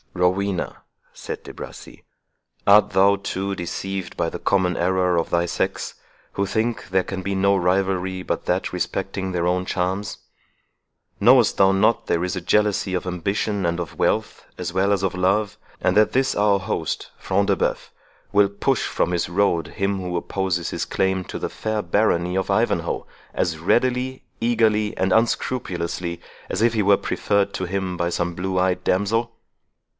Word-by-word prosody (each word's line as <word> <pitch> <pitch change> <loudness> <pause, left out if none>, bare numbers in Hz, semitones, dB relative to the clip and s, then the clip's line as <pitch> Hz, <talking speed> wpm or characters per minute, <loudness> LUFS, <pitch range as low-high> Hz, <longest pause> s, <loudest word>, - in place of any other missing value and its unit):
"Rowena," 90 +1 0 0.3
said - - -7
De - - -9
Bracy, - - -10 0.6
"art 105 +1 +7
thou, 95 +2 +4
too, 100 0 -3
deceived 95 +2 -5
by - - 0
the - - -6
common 90 -3 +1
error 90 0 +1
of 85 - 0
thy 85 0 +2
sex, 85 - -2 0.4
who 100 - 0
think 110 0 -2
there 95 0 +2
can 95 0 -5
be 100 +1 -2
no 100 +1 +3
rivalry 95 0 0
but - - -3
that - - -1
respecting 95 +2 -2
their 90 -1 0
own 90 +1 +1
charms? 95 +2 -2 1.0
Knowest 120 +2 +6
thou 95 -1 +5
not 95 +4 +2
there 85 - +1
is 90 - -2
a 90 - -3
jealousy 105 0 +1
of 90 - -1
ambition 100 +2 -1
and 85 +1 0
of 85 -4 -6
wealth, - - 0
as - - -4
well 95 +2 +2
as 100 -2 +2
of 95 -2 0
love; 100 +3 +1 0.2
and 90 - +1
that 105 0 +5
this 130 +1 +2
our 100 -1 +3
host, 95 -5 -3
Front 100 +1 0
de - - +3
Bœuf, - - -2 0.4
will 100 -1 +5
push 100 - 0
from - - 0
his 85 -2 -1
road 90 -2 +1
him 100 -1 -2
who 90 -1 -3
opposes 90 -1 -2
his - - -2
claim 95 -1 0
to - - -6
the - - -2
fair 110 -1 -2
barony 90 -2 +1
of 95 - -1
Ivanhoe, - - 0 0.3
as 80 -3 -1
readily, 125 +8 +1 0.2
eagerly, 110 -2 +2
and 95 0 +1
unscrupulously, 90 -7 -1 0.3
as - - -2
if 115 0 +4
he 110 - +1
were 100 0 +5
preferred 100 -1 0
to 95 - -2
him 95 0 -2
by 85 0 0
some 85 0 -1
blue 95 +1 -2
eyed 90 0 +1
damsel? 115 +5 0
95 Hz, 170 wpm, -23 LUFS, 90-100 Hz, 1.0 s, art